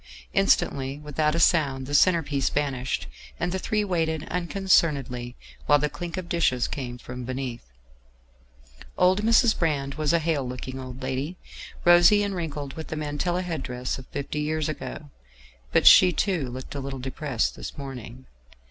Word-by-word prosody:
Instantly, 135 0 +2
without 150 +1 -1
a - - 0
sound, 140 -6 +3
the 145 - -6
centre 170 +3 +5
piece 140 -1 0
vanished, 130 - -2 0.3
and 175 - -1
the 190 - -2
three 210 +2 0
waited 160 -5 -1
unconcernedly 155 -9 +1 0.3
while 145 - +6
the 150 +1 -1
clink 175 0 -6
of 185 -2 -4
dishes 160 -8 +1
came 125 -4 -5
from 125 +1 -8
beneath. 130 -1 -4 1.3
Old 185 +3 +4
Mrs. 225 +1 +4
Brand 140 -4 0
was 150 - +2
a 170 - +4
hale 160 -3 0
looking 130 +1 -6
old 130 0 -8
lady, 135 +7 -3 0.5
rosy 175 +4 +7
and 200 -1 -2
wrinkled, 150 -6 -4
with 160 - -7
the - - -4
mantilla 155 +4 -2
head 165 -5 -3
dress 125 0 -4
of 130 - -12
fifty 140 +1 -4
years 155 0 -1
ago; 150 -1 -6 0.6
but - - +3
she, 180 - +9
too, 175 -7 -1
looked 130 +1 -8
a 140 - -4
little 135 0 -5
depressed 130 -1 -2
this - - -8
morning. 130 -2 -8
145 Hz, 165 wpm, -25 LUFS, 130-170 Hz, 1.3 s, she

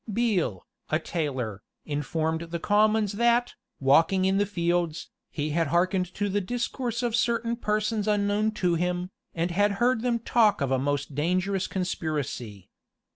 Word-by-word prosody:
Beale, 200 - 0 0.2
a 155 - +2
tailor, 135 - -3 0.2
informed 160 +3 -2
the 170 - -2
commons 210 +2 +2
that, 235 +3 +2 0.3
walking 165 +8 +4
in 190 +1 +2
the 205 - +2
fields, 175 -3 -1 0.2
he 150 0 -3
had 165 +1 +1
hearkened 180 +2 +1
to 205 - -1
the 205 +1 0
discourse 240 +3 -3
of 235 -2 0
certain 235 0 +1
persons 215 -1 -1
unknown 205 +1 +2
to 180 -4 +1
him, 180 +2 -1 0.2
and 170 +1 -1
had 205 +3 +2
heard 240 +3 +2
them 240 -1 +1
talk 230 -2 +3
of 140 -2 -1
a 130 - +2
most 145 +1 -1
dangerous 185 +6 0
conspiracy. 145 - -4
185 Hz, 150 wpm, -27 LUFS, 160-215 Hz, 0.3 s, walking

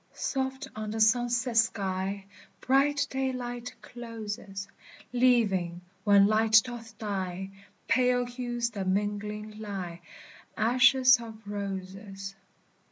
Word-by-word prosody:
Soft 265 +1 -2
on 215 -1 -4
the 220 +1 -3
sunset 240 +2 +2
sky 195 -3 0 0.3
Bright 285 +2 +3
daylight 250 -2 -3
closes, 210 -4 -7 0.5
Leaving, 205 -9 +2 0.2
when 200 -1 +6
light 220 +1 +5
doth 230 -2 -9
die, 190 -2 -4 0.4
Pale 250 +1 +3
hues 240 -1 -3
that 195 -3 -4
mingling 210 +2 -2
lie, 190 -5 -5 0.6
Ashes 250 +2 +5
of 225 -2 -9
roses. 195 0 -6
220 Hz, 100 wpm, -29 LUFS, 200-245 Hz, 0.6 s, when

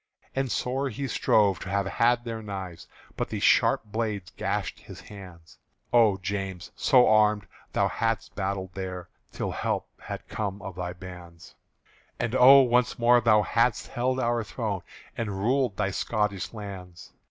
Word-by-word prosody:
And 135 -2 -1
sore 135 +2 -1
he 135 +4 -4
strove 100 -7 +2
to 95 - -7
have 100 0 0
had 120 +4 +2
their 115 -2 -5
knives, 95 -5 -7 0.3
But - - -3
the - - -3
sharp - - +4
blades 105 -4 -3
gashed - - -2
his - - -12
hands. 90 -5 -13 0.3
Oh 110 -5 +5
James! 95 -2 -4
so 130 -3 +5
armed, 105 -1 +4 0.3
thou - - +2
hadst 115 -2 -2
battled 95 -2 -3
there 90 -1 -6 0.2
Till - - -3
help - - -2
had - - -7
come 100 -2 -4
of 95 - -6
thy 90 -1 -4
bands; 90 -2 -12 0.7
And 115 - -2
oh! 130 +2 +8
once 125 -1 +2
more 120 +1 +5
thou 110 -2 +4
hadst 115 +2 +1
held 130 +2 -1
our 120 -1 0
throne 105 -3 -3 0.3
And 105 -4 -3
ruled 125 -1 +1
thy 100 -2 0
Scotish 105 -1 -1
lands! 95 -5 -9
105 Hz, 155 wpm, -27 LUFS, 95-120 Hz, 0.7 s, oh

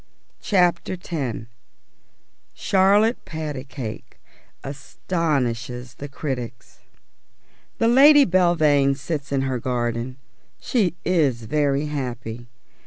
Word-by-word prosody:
CHAPTER 180 -3 +2
X 140 - -4 1.1
CHARLOTTE 200 +4 +3
PATACAKE 140 -7 -6 0.5
ASTONISHES 135 -4 -3
THE 145 - -6
CRITICS 125 -5 -6 1.0
The 230 - +2
Lady 280 +4 +7
Belvane 155 -7 +3
sits 145 -1 -5
in 135 -1 +1
her 130 -2 -1
garden. 120 +1 -2 0.4
She 195 - 0
is 145 -10 +1
very 145 +3 0
happy. 125 -5 -5
140 Hz, 85 wpm, -23 LUFS, 125-175 Hz, 1.1 s, Lady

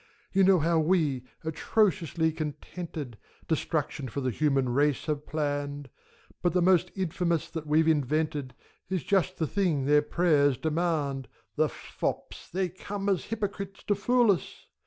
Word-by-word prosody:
You 195 0 +5
know 190 0 +6
how 165 +1 +2
we, 155 -6 +1 0.2
atrociously 165 -1 +1
contented. 155 -4 -6 0.3
Destruction 150 -3 -1
for 140 - -4
the 130 -2 -1
human 135 -1 +1
race 145 +2 +1
have 150 -1 -3
planned: 145 -2 -3 0.5
But 175 -3 +1
the 180 - +3
most 180 0 +4
infamous 170 -3 0
that 155 -2 -5
we've 155 +2 +3
invented 150 -3 0 0.3
Is 185 -6 -1
just 185 +1 +1
the 160 - 0
thing 160 -6 0
their 150 +1 +5
prayers 150 -4 +3
demand. 155 -5 -1 0.3
The - - +2
fops, - - -5
they 185 +1 0
come 195 +3 -4
as 190 -3 +1
hypocrites, 200 -3 -4
to 205 - +2
fool 235 +2 +3
us 180 - -4
160 Hz, 145 wpm, -28 LUFS, 145-185 Hz, 0.5 s, know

